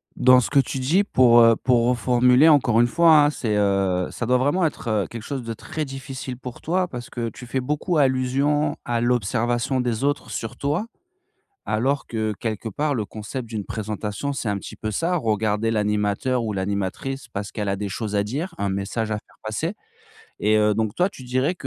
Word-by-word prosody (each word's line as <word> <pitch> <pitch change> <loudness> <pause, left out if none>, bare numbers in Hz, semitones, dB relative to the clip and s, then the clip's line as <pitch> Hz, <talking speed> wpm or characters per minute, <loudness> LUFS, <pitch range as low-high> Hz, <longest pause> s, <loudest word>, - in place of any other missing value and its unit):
Dans 130 0 +6
ce - - -3
que 145 - +4
tu 135 0 -1
dis 160 +10 +2
pour, 125 - +5
heu 115 0 +6
pour 120 0 +2
reformuler 125 +3 +4
encore 125 -6 +4
une 120 - +4
fois 160 +1 +6
hein. - - +3
C'est, 115 -7 -2
heu 95 -3 +1
ça 120 - -4
doit 125 +2 +3
vraiment 145 +8 +2
être, 150 -6 -3
heu, 105 -3 0
quelque 115 - -8
chose 135 -1 -4
de 115 0 -4
très 155 +7 -5
difficile 135 -1 -6
pour 125 -1 -9
toi. 180 +2 0
Parce 120 -6 -8
que 120 -1 -3
tu 125 - -11
fais 130 +2 -2
beaucoup 150 +6 -1
allusion 140 +2 +2
à 120 -1 -1
l'observation 120 +2 0
des 120 0 -2
autres 145 +1 -1
sur 115 +2 -5
toi. 150 +11 -1 0.8
Alors 135 +6 0
que, 110 -2 -2
heu, - - -3
quelque 110 0 -3
part 145 +7 -1
le 110 - -1
concept 110 +4 -6
d'une 110 -3 -4
présentation 110 +4 -4
c'est 125 - -4
un 100 - 0
petit - - -9
peu 110 - -4
ça, 165 - 0
regarder 110 -3 0
l'animateur 105 +3 0
ou 110 -2 -2
l'animatrice. 100 +7 -3
Parce 100 -3 -5
qu'elle 105 -2 -3
a 100 - 0
des 100 0 -4
choses 105 +1 -4
à 100 - +2
dire, 150 - -4
un 100 - -1
message 100 +3 -2
à 105 - 0
faire - - -16
passer. 110 - -2 0.7
Et 110 +1 +3
heu, 105 0 +3
donc 110 -1 -1
toi 180 +2 +2
tu 135 - -12
dirais 130 +6 0
120 Hz, 210 wpm, -23 LUFS, 110-135 Hz, 0.8 s, Dans